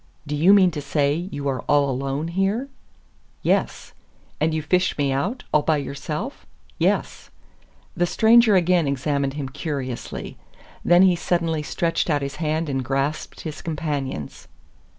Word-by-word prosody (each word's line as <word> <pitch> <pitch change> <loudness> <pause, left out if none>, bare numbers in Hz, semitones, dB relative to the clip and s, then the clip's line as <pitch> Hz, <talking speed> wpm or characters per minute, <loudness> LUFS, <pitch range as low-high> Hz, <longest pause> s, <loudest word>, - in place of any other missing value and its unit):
"Do 150 0 -3
you 165 +6 +5
mean 190 -3 +6
to 150 -2 -5
say 140 0 +1 0.2
you 140 0 -4
are 135 -2 -1
all 145 -1 +4
alone 135 +4 -2
here?" 195 +9 -1 0.7
"Yes. - - 0 0.5
"And 155 +2 +2
you 155 -1 -2
fished 180 +4 +1
me 140 -2 +1
out 195 - -2
all 150 - +5
by 155 0 +1
yourself?" 150 - -5 0.4
"Yes." - - 0 0.7
The 175 0 +1
stranger 225 +1 +5
again 175 -3 +3
examined 140 0 -1
him 145 -2 -3
curiously. 135 -3 -5 0.5
Then 175 +1 +6
he 185 -2 +5
suddenly 170 -2 0
stretched 165 +3 -1
out 145 -2 +1
his 140 +1 -5
hand 155 +1 -1
and 135 -2 -2
grasped 135 +4 -2
his 155 -2 -6
companion's. 145 - -4
150 Hz, 150 wpm, -23 LUFS, 140-175 Hz, 0.7 s, mean